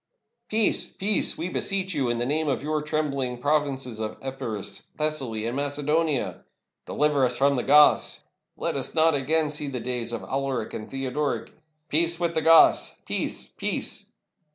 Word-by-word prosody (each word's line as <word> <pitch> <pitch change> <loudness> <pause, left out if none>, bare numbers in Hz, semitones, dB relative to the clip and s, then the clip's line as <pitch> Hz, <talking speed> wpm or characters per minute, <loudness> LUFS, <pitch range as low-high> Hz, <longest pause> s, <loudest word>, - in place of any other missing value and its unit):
"Peace! 220 -1 +2
peace! 205 +2 +1
we 165 - -3
beseech 190 0 -1
you, 135 -5 0
in 120 - 0
the 120 - -1
name 155 +4 0
of 135 -1 -1
your 155 0 -1
trembhng 140 -5 -2
provinces 135 -4 -1
of 110 -1 -4
Epirus, 130 -6 -5
Thessaly, 135 -8 -1
and 120 +2 -2
Mace 145 +1 -2
donia!" 150 -1 0 0.5
"Deliver 150 -2 +1
us 125 -1 +1
from 140 +1 +3
the 125 - 0
Goths!" 150 +3 +4 0.3
"Let - - -2
us - - -3
not 160 0 +4
again 150 +2 +1
see 150 -1 -2
the 130 -3 -4
days 120 -1 -2
of 115 - -4
Alaric 135 -4 -3
and 110 - -6
Theod 135 -1 -4
oric!" 150 -1 -2 0.4
"Peace 170 +2 +2
with 170 -1 0
the 160 - 0
Goths! 165 +1 +5
Peace! - - -3
peace!" - - -3
145 Hz, 170 wpm, -25 LUFS, 130-155 Hz, 0.5 s, Goths